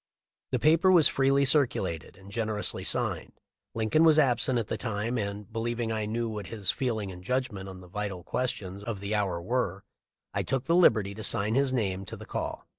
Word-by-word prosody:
The - - 0
paper 165 +5 +4
was 170 -6 +7
freely 135 +1 +2
circulated 125 - +1
and 95 +1 -14
generously 110 -2 -1
signed. - - -2 0.4
Lincoln 115 +8 +2
was 160 -2 +6
absent 125 -3 +4
at 115 - 0
the - - -3
time 110 +1 -3
and, 100 0 -5
believing 115 0 -2
I 110 -1 -2
knew 115 +2 -1
what 105 -3 -5
his 105 -4 +1
"feeling 110 -7 -2
and 90 0 -11
judgment" 105 -4 -2
on 95 -1 -10
the 90 - -13
vital 100 -1 -5
questions 100 -4 -3
of 105 -2 -4
the 100 +2 -3
hour 100 -5 0
were, 100 0 -2 0.5
I - - 0
took 135 -2 -1
the 165 - +1
liberty 105 - +4
to 110 +2 -7
sign 105 +2 +2
his 135 +1 +2
name 100 -6 -1
to - - -8
the - - -10
call. - - -4
110 Hz, 195 wpm, -28 LUFS, 100-130 Hz, 0.5 s, was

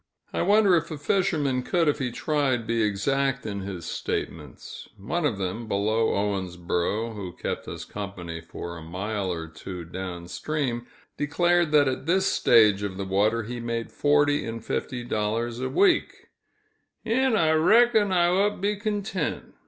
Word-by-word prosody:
I - - 0
wonder 205 -2 +5
if 165 0 0
a 155 - -5
fisherman 145 -6 +1
could, 170 +5 +1
if 145 - +2
he 125 -3 -1
tried, 135 -3 0
be 115 0 0
exact 125 +5 0
in 100 -2 -3
his 95 -3 -6
statements. 75 -6 -5
One 150 - -1
of 115 -8 -2
them, 100 +4 -4
below 110 +2 +1
Owensboro, 95 +2 -1
who 95 -4 -6
kept - - -4
us - - -6
company 90 -5 -6
for 85 +1 -7
a 80 - -9
mile 95 +4 -3
or 80 -2 -4
two 85 +2 -8
down 90 0 -6
stream, 125 - -3 0.3
declared 175 +2 +2
that 145 -2 +6
at 130 +2 -3
this 190 +3 +3
stage 105 - +4
of 100 -2 -4
the 100 - -3
water 105 +4 +1
he 120 +3 -6
made 115 -1 -3
forty 145 0 +2
and 115 0 -6
fifty 125 -2 -3
dollars 115 +1 -2
a 130 - -2
week, 370 -3 +2 0.8
"'n' 245 +2 +2
I 160 -6 +3
reck'n 215 +6 +4
I 175 -2 +4
ote 195 +4 +2
to - - -13
be 205 +2 -1
contint." 200 -5 -3
120 Hz, 165 wpm, -26 LUFS, 100-160 Hz, 0.8 s, that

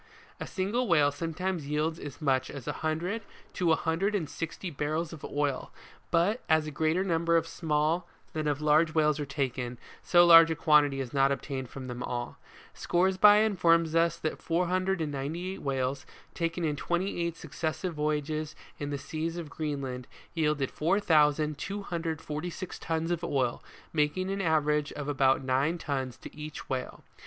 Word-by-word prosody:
WHALE - - -28
FISHING. - - -23
A - - -5
single 210 +6 0
whale 150 -5 +4
sometimes 165 +2 -3
yields 155 +2 -1
as 145 - -8
much 135 -4 +1
as 140 -4 -8
a - - +1
hundred 170 +7 -2 0.3
to 175 -3 +1
a - - +6
hundred 180 +7 0
and 170 -7 -1
sixty 165 +4 -5
barrels 155 +3 -2
of 155 - -10
oil, 145 -2 -2 0.4
but 195 +9 +2
as 160 -1 +4
a 155 - -5
greater 160 +5 +1
number 170 -2 +2
of 165 - +1
small, 160 +1 0 0.3
than 155 -1 -2
of 145 0 0
large 155 +2 +3
whales 150 -1 +3
are 145 - -3
taken, 130 -3 -2 0.2
so 175 -1 +5
large 165 -1 +9
a 160 - 0
quantity 150 -3 +4
is 125 -2 -6
not 135 0 +4
obtained 135 -2 -3
from 135 -1 -8
them 125 -1 -6
all. 120 -1 -4 0.3
Scoresby 190 +4 +4
informs 170 -5 +3
us 165 0 +3
that 155 - -3
498 175 -1 -1
whales, 135 0 -2 0.3
taken 165 0 -1
in 150 -2 0
twenty 175 +4 -1
eight 170 -1 -3
successive 160 +3 -3
voyages 155 0 -2 0.2
in 145 - -3
the 145 - -2
seas 160 +4 -4
of 160 -4 -6
Green 150 -3 -3
land, 125 -1 -5 0.3
yielded 150 -4 0
4,246 160 0 0
tons 165 +1 -2
of 175 -1 -1
oil, 130 -7 0 0.3
making 165 +5 0
an 195 0 -2
average 150 -3 +1
of 145 -1 -5
about 135 -2 +2
nine 135 +6 +1
tons 130 -6 -3
to - - -11
each 150 0 -7
whale. 130 -1 -4
155 Hz, 165 wpm, -29 LUFS, 145-170 Hz, 0.4 s, large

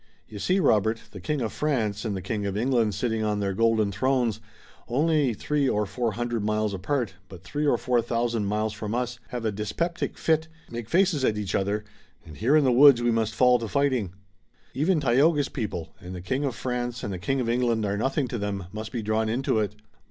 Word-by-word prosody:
You 105 - -9
see, 185 - +2
Robert, 110 - +3
the 95 - -9
King 145 +9 -2
of 115 - -2
France 110 -9 -1
and 105 -3 -1
the 95 - -6
King 100 +1 -2
of 100 0 -2
England 115 -3 +1
sitting 110 +1 -1
on 105 -1 0
their 100 -1 -1
golden 110 0 +2
thrones, 120 +1 +1 0.5
only 145 0 +2
three 145 +3 0
or 105 0 +1
four 110 +3 -2
hundred 120 -1 -2
miles 105 0 0
apart, 110 +4 -1 0.2
but 95 -2 -11
three 145 +11 -2
or 120 - +4
four 125 0 +1
thousand 115 -2 -1
miles 105 +1 -1
from 110 +1 -4
us, 125 0 -2
have 120 -1 -5
a 110 - +1
dyspeptic 135 - -3
fit, 160 0 +1 0.2
make 120 -1 -6
faces 175 -4 +2
at 105 -4 +2
each 105 -2 -3
other, 100 +2 0 0.4
and 80 -3 -11
here 130 +7 +3
in 155 - +5
the 130 - +3
woods 135 0 +8
we 120 - +3
must 110 -2 0
fall 125 +1 +5
to 115 - -4
fighting. 130 -8 +1 0.6
Even 160 +4 +2
Tayoga's 145 +3 +3
people 105 - -4
and 90 -2 -8
the - - -5
King 130 +10 -1
of 130 -4 -2
France 125 -1 -3
and 100 - -3
the 90 - -5
King 135 +9 -1
of 125 - -1
England 115 -2 +1
are 100 0 0
nothing 135 +5 0
to 120 - -4
them 100 -2 -3
must 110 +1 -6
be 120 -4 -3
drawn 110 +1 0
into 120 -1 +1
it." 105 -1 -2
115 Hz, 220 wpm, -26 LUFS, 105-130 Hz, 0.6 s, woods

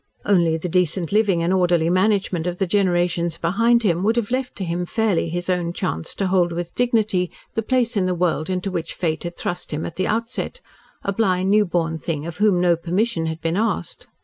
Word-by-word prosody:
Only 170 -5 +3
the 165 - -4
decent 175 -1 0
living 200 -5 +2
and 175 +2 +1
orderly 175 -3 +2
management 185 -3 +1
of 180 0 -2
the 195 - +1
generations 175 -3 +1
behind 230 +7 +2
him 175 -4 +2
would 220 +4 +2
have 235 -2 -1
left 255 0 -2
to 195 - -4
him 170 +1 -2
fairly 215 -7 +1
his 175 +2 -3
own 175 -2 0
chance 80 - -3
to 195 - -1
hold 180 -2 +2
with 170 0 -4
dignity 215 -7 +1 0.2
the 225 - 0
place 245 0 0
in 190 -3 +1
the 180 - 0
world 170 -2 0
into 185 +1 -2
which 170 -3 -4
Fate 160 -3 -1
had 175 0 -6
thrust 175 - -4
him 155 +1 -3
at 165 - -7
the 185 - 0
outset 230 - -2 0.4
a 200 - -1
blind, 190 -3 +1
newborn 175 -6 +1
thing 155 -1 -3
of 170 -1 -6
whom 205 -4 +3
no 175 -1 +4
permission 175 +1 -1
had 160 0 -4
been 165 +1 -1
asked. 225 +2 -2
180 Hz, 210 wpm, -22 LUFS, 170-205 Hz, 0.4 s, no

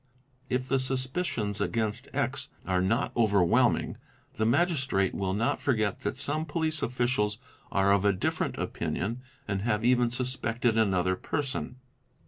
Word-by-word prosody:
If 125 0 -1
the 135 0 +2
suspicions 130 - -1
against 110 0 -1
X - - -1 0.2
are 90 0 +1
not 110 +8 0
overwhelming, 100 -7 +3 0.4
the 110 - 0
Magistrate 130 - +2
will 95 -1 -1
not 115 +3 0
forget 110 -7 +1
that - - -3
some 145 +3 0
police 155 0 -1
officials 120 -4 0 0.3
are 100 0 +3
of 100 -1 +2
a 100 - +5
different 95 - -1
opinion 115 +7 -3 0.3
and 100 -2 -1
have 110 0 0
even 125 -1 +4
suspected 120 -2 0
another 95 -4 +2
person. 135 +1 -3
115 Hz, 135 wpm, -28 LUFS, 100-130 Hz, 0.4 s, a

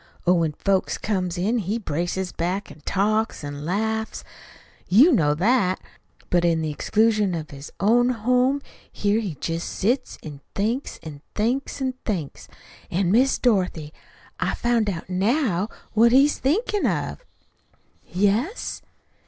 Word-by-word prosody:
Oh, 180 - +5
when 165 -3 +1
folks 195 +4 0
comes 185 -4 -2
in 215 +7 +1
he 205 +2 -1
braces 175 -1 -2
back 180 +1 -3
an' 145 +1 -14
talks 215 0 0
an' 145 0 -6
laughs. 220 +5 -2 0.6
YOU 255 - +6
know 150 - +3
that. 190 +1 +2 0.5
But 175 -1 +3
in 165 -2 +2
the 155 - -1
exclusion 210 +3 +2
of 160 0 -6
his 140 +1 -9
own 240 +5 +4
home 250 +4 +1 0.3
here 205 +2 +1
he 195 -8 -4
jest 165 +4 -3
sits 240 +8 -1
an' 145 -3 -9
thinks 230 +7 -1
an' 150 -3 -9
thinks 250 +7 -1
an' 260 -1 0
thinks. 175 -10 -4 0.4
An', 180 0 +1
Miss 255 +5 +4
Dorothy, 180 -10 0 0.5
I've - - -1
found 235 -3 +1
out 170 -4 -5
now 205 - +1 0.2
what 230 +2 +5
he's 275 +4 +4
thinkin' 405 - +1
of." - - -2 0.8
"Yes?" 205 - -1
200 Hz, 140 wpm, -24 LUFS, 175-235 Hz, 0.8 s, YOU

